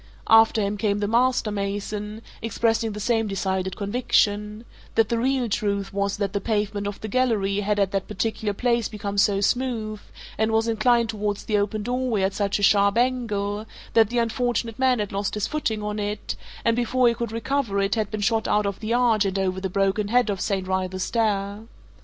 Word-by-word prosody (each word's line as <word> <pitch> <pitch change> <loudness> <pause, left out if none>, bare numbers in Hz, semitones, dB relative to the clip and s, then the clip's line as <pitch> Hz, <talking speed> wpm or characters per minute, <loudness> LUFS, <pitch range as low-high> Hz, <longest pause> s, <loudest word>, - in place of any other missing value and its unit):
After 225 -1 +6
him 200 +1 -1
came 205 -1 0
the 205 0 -1
master 240 0 +2
mason, 205 +2 -4 0.2
expressing 225 0 0
the 210 - -6
same 225 0 +1
decided 190 -1 -2
conviction 210 0 0 0.3
that 225 -2 +3
the 235 - 0
real 260 0 +1
truth 200 -3 -1
was 200 0 -1
that 200 -2 -2
the 200 - -1
pavement 205 -1 -1
of 205 - -5
the 220 - -4
gallery 210 -4 +1
had 205 0 0
at 200 -1 +2
that 195 -1 -2
particular 215 +1 -2
place 235 0 +1
become 205 -2 -3
so 200 0 +3
smooth, 225 -2 -1 0.4
and 220 0 +2
was 225 +1 +2
inclined 230 +1 +2
towards 210 -2 -2
the 210 -2 +1
open 205 +1 -1
doorway 245 -3 0
at 190 0 +1
such 200 -1 0
a 205 - -4
sharp 200 +1 +4
angle, 220 -4 0 0.3
that 225 -2 +5
the 240 - -2
unfortunate 235 -1 -1
man 260 -1 +3
had 210 -2 -3
lost 200 +1 -2
his 210 - -1
footing 225 -9 -2
on 210 0 -3
it, 205 0 -3 0.3
and 230 0 +3
before 245 +1 +2
he 235 - +4
could 235 -1 -4
recover 230 -2 -1
it 195 +1 +1
had 215 -3 0
been 215 -1 -4
shot 225 +1 +1
out 210 0 +2
of 200 -1 -3
the 225 +2 -1
arch 235 -4 +3
and 195 0 -1
over 190 -1 -1
the 190 - -2
broken 195 +2 +1
head 240 -1 +2
of 195 - -4
St. 195 -3 -1
Wrytha's 185 0 -1
Stair. 205 -2 -1
210 Hz, 200 wpm, -24 LUFS, 200-230 Hz, 0.4 s, After